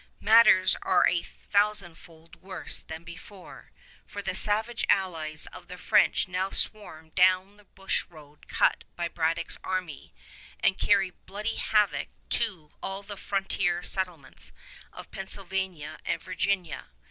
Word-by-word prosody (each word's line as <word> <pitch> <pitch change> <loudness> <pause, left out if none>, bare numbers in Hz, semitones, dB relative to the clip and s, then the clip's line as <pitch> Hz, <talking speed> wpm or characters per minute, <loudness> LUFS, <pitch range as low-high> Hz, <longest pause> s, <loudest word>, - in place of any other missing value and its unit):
Matters 220 -4 +7
are 185 - +4
a 175 - +2
thousandfold 175 -6 -2
worse 190 +1 -5
than 160 +1 -8
before, 180 +3 -12 0.4
for - - -6
the - - -1
savage 220 +3 +1
allies 160 -6 0
of - - -11
the 180 +1 -8
French - - +3
now 185 +1 -1
swarm 160 -8 -3
down 185 +2 +4
the 210 - -20
bush 195 0 -2
road 150 -3 -16
cut - - +2
by 170 -1 -1
Braddock's 165 0 -1
army 185 -5 -4 0.5
and 190 - +2
carry 195 -4 +3
bloody 210 +5 -5
havoc 210 -2 +2 0.2
to 185 -10 -1
all 195 +1 -4
the 205 0 -7
frontier 195 -2 0
settlements 180 -8 -3 0.4
of - - -11
Pennsylvania 190 -4 -4
and - - -1
Virginia. 185 -3 -2
185 Hz, 130 wpm, -28 LUFS, 170-200 Hz, 0.5 s, Matters